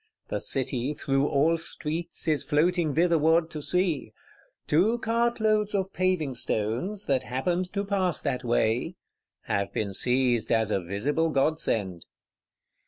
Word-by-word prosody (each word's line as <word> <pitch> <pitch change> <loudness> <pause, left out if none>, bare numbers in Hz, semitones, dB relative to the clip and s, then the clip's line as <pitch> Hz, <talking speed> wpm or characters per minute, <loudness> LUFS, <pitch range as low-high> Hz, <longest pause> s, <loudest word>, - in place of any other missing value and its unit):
The - - -2
City, 130 +1 -2
through 140 -1 0
all 155 +4 +2
streets, 165 +1 -4
is 155 -2 +2
flowing 160 0 +1
thitherward 165 0 +3
to 155 - -5
see: 170 - 0 0.5
"two 195 +10 +3
cartloads 225 -3 +1
of 195 -1 -1
paving 185 -7 0
stones, 120 - -2
that 135 -2 +1
happened 175 +9 -2
to 200 0 -1
pass 190 -4 +1
that 125 +1 -2
way" 120 +7 0 0.5
have 100 0 -2
been 100 -2 -2
seized 125 +1 +1
as 110 -2 +2
a 95 - +1
visible 135 - -1
godsend. 125 - 0
155 Hz, 130 wpm, -27 LUFS, 125-180 Hz, 0.5 s, thitherward